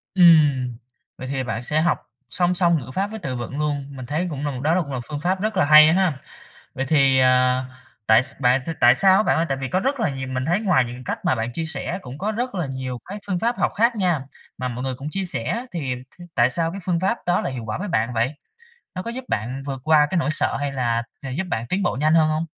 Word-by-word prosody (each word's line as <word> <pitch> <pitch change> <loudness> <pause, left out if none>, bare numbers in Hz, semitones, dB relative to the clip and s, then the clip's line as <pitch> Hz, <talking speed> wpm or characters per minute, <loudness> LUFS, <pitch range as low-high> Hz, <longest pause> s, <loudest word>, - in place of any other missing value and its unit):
Ừm. 145 -9 +5 0.4
Vậy 130 - -7
thì 135 -1 -2
bạn 115 -1 -3
sẽ 150 +5 0
học 170 - 0 0.2
song 180 0 +1
song 170 -2 +3
ngữ 130 -1 -9
pháp 195 +9 -1
với 220 - -7
từ 135 -9 -4
vựng 125 +4 -5
luôn. 145 -2 -1
Mình 130 -2 -7
thấy 155 +7 -2
cũng 145 -2 -4
là 145 - -1
m 130 -1 -6
đó 165 +4 +2
cũng 140 -4 -6
là 130 - -2
phương 150 -1 -5
pháp 185 +4 -1
rất 215 -1 -1
là 180 - +4
hay 155 +2 +8
ha. 180 -6 +1 0.6
Vậy 135 - -2
thì, 135 -3 +4
ờ 130 0 +3 0.4
tại 110 +2 +6
s 130 - -1
bạn 125 +1 +3
thì 165 - -2
tại 120 +1 +7
sao 190 +6 +5
á 210 - +4
bạn - - +2
ơi? 165 +1 +1
Tại 135 -1 -1
vì 135 - -3
có 185 - 0
rất 270 +3 -1
là 220 - +1
nhiều 130 -1 -5
mình 130 0 -2
thấy 175 +7 +1
ngoài 180 - +3
những 120 - -7
cái 130 - -10
cách - - -4
mà - - +3
bạn 115 +1 -3
chia 165 - -3
sẻ 165 +2 -3
cũng 130 +3 -9
có 210 +3 -2
rất 245 +2 -3
là 175 -5 -2
nhiều 130 -2 -5
cái 200 +3 -7
phương 185 -3 -1
pháp 235 +5 -1
học - - +1
khác 230 +2 +2
nha, 180 -6 +1 0.4
mà 130 0 -2
mọi 125 +1 -5
người 130 - -2
cũng 135 +4 -6
chia 195 +3 -3
sẻ, 180 - -1
thì 140 -7 -2 0.2
t - - -11
tại 120 0 +3
sao 165 +5 0
phương 175 -2 0
pháp 195 +6 0
đó 175 0 +2
lại 135 - -3
hiệu 120 -3 -6
quả 110 - -4
với 205 +3 -4
bạn 115 -5 0
vậy? 120 +6 0 0.6
Nó 185 - -4
có 230 - -5
giúp 250 +2 -6
bạn 125 +6 -3
vượt 135 -2 -4
qua 155 -2 +5
nỗi 155 - 0
sợ 155 - +1
hay 145 -1 -2
là 120 -3 0 0.2
gi 135 - -6
giúp 190 - -1
bạn 115 -3 -2
tiến 195 +2 -1
bộ 180 - 0
nhanh 155 +2 +3
hơn 160 -1 +4
hông? 155 +1 0
150 Hz, 275 wpm, -22 LUFS, 130-180 Hz, 0.6 s, hay